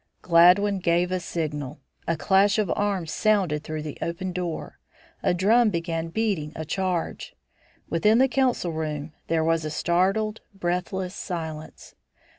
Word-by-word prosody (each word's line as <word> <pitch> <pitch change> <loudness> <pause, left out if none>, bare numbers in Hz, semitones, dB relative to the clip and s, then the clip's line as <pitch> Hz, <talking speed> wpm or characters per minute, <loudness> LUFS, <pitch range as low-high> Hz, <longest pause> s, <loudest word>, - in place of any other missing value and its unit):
Gladwin 185 +4 +5
gave 175 0 +1
a 185 - 0
signal. 150 -6 -4 0.3
A 165 - 0
clash 200 +5 +3
of 210 -5 0
arms 195 -6 -1
sounded 190 -9 +1
through 155 -1 -5
the 150 -2 -7
open 175 +2 -3
door. 175 -2 -5 0.4
A - - +2
drum 215 +6 +4
began 165 -2 -2
beating 170 -5 -1
a 160 - -5
charge. 180 +1 -3 0.5
Within 210 +7 +3
the 265 +2 +5
council 255 -9 +1
room 155 -1 -4
there 165 -1 +1
was 165 0 +1
a 155 - -3
startled, 195 +7 0
breathless 180 +1 -2
silence. 160 -5 -6
175 Hz, 140 wpm, -25 LUFS, 160-195 Hz, 0.5 s, Gladwin